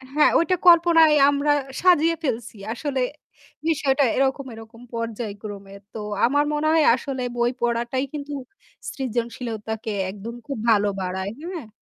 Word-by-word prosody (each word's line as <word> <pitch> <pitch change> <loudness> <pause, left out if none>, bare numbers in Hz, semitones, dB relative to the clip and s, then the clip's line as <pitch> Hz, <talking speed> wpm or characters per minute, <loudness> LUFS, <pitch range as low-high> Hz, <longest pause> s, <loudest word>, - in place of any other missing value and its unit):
হ্যাঁ। 300 - +5
ওইটা 365 +2 +2
কল্পনায় 330 -2 +7
আমরা 285 +1 +1 0.3
সাজিয়ে 335 -2 +4
ফেলছি। 235 -4 -3 0.2
আসলে 270 0 -2 0.7
বিষয়টা 285 -3 +2
এরকম 270 0 0
এরকম 225 +1 -12
পর্যায়ক্রমে। 210 -3 -6 0.2
তো 220 - -6 0.3
আমার 285 +4 +2
মনে 300 +1 0
হয় 320 -2 +4
আসলে 265 -1 -4
বই 240 +1 +2
পড়াটাই 240 +3 0
কিন্তু 290 0 -5 0.6
সৃজনশীলতাকে 230 -3 -4 0.2
একদম 210 +4 -8
খুব 275 - -4
ভালো 205 -2 +4
বাড়ায়। 190 +2 -3 0.2
হ্যাঁ। 310 -11 -7
250 Hz, 125 wpm, -23 LUFS, 225-290 Hz, 0.7 s, কল্পনায়